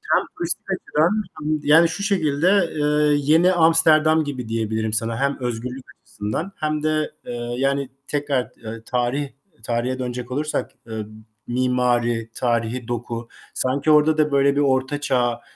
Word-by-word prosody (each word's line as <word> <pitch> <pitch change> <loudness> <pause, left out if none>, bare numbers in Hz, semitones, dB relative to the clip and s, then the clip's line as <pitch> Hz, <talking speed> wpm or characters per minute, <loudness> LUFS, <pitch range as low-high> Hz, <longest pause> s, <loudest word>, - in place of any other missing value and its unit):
hem - - +2
turistik - - -2
açıdan 160 +4 +1 0.3
hem 155 +1 0
yani 165 +3 +6
şu 200 - -4
şekilde, 180 0 +2
eee, 150 0 +2 0.2
yeni 175 +3 +5
Amsterdam 160 -1 +5
gibi 130 -6 -5
diyebilirim 110 -1 -1
sana. 115 +1 -1
Hem 140 +1 0
özgürlük 125 +2 -4 0.2
açısından 105 - -4
hem 155 0 -2
de, 155 0 0
eee, - - -5 0.2
yani 135 0 0 0.2
tekrar, 145 -3 -1
eee, 110 0 -7
tarih 125 +3 -1 0.3
tarihe 125 +2 -1
dönecek 125 -1 -5
olursak, 150 +4 -2 0.2
eee, 110 -1 -5 0.4
mimari, 120 -2 +1
tarihî 120 0 -1
doku. 120 -1 -4 0.3
Sanki 140 +4 +1
orada 155 +1 +4
da 150 -1 +2
böyle 140 0 +3
bir 145 - +2
Orta 135 +1 +1
Çağ, 120 -4 0
135 Hz, 145 wpm, -22 LUFS, 120-155 Hz, 0.4 s, yani